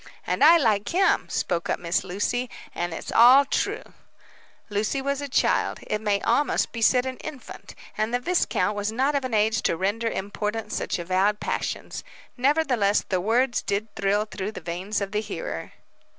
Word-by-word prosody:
"And - - 0
I 330 +3 +8
like 215 -9 +1
him," 380 +2 +2
spoke 170 -2 -2
up - - 0
Miss 170 0 0
Lucy. 205 +7 -2 0.2
"And 175 0 -3
it's 165 - -6
all 255 +4 +7
true." - - -1 0.8
Lucy 215 +6 -1
was 280 +1 -2
a 285 - -4
child - - +1
it 210 - -2
may 205 -2 +1
almost 290 - +1
be 230 - -6
said 250 +2 +4
an 260 -1 -4
infant 295 -5 -10 0.2
and 215 +1 0
the 245 - +1
viscount 245 - 0
was 205 +1 -2
not 265 +6 +1
of 280 -1 0
an 255 -3 -2
age 220 +2 +2
to 165 - 0
render 205 +6 -1
important 210 +2 -4
such - - -2
avowed 185 +4 +1
passions. - - -4 0.3
Nevertheless, 255 -7 +2
the 185 -2 0
words 240 +5 +1
did 205 +2 -3
thrill 200 +2 +1
through 210 0 -5
the - - -6
veins 180 +5 -3
of 195 -1 -3
the 210 0 0
hearer. 170 - -6
215 Hz, 180 wpm, -25 LUFS, 200-255 Hz, 0.8 s, I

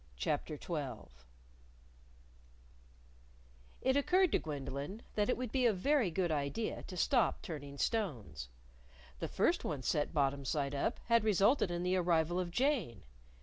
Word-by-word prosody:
CHAPTER 150 - -2
XII 135 - -5 2.7
It 260 0 +2
occurred 360 +6 +3
to - - +3
Gwendolyn 145 - -5
that 210 +2 +1
it - - +2
would 250 -3 -4
be 255 -2 +3
a 225 - +3
very 245 +3 +2
good 175 0 0
idea 150 +9 -2
to 185 - -7
stop 245 - +2
turning 145 -4 -7
stones. 130 - -2 0.7
The - - -2
first - - +1
one 140 -3 -3
set 145 +4 0
bottom 140 -2 +1
side 140 +1 -1
up 140 - -1
had 230 -2 +4
resulted 210 +2 +3
in 175 0 -2
the 180 +1 +2
arrival 175 -1 +2
of 180 -1 -2
Jane. 215 - 0
175 Hz, 145 wpm, -34 LUFS, 140-230 Hz, 2.7 s, had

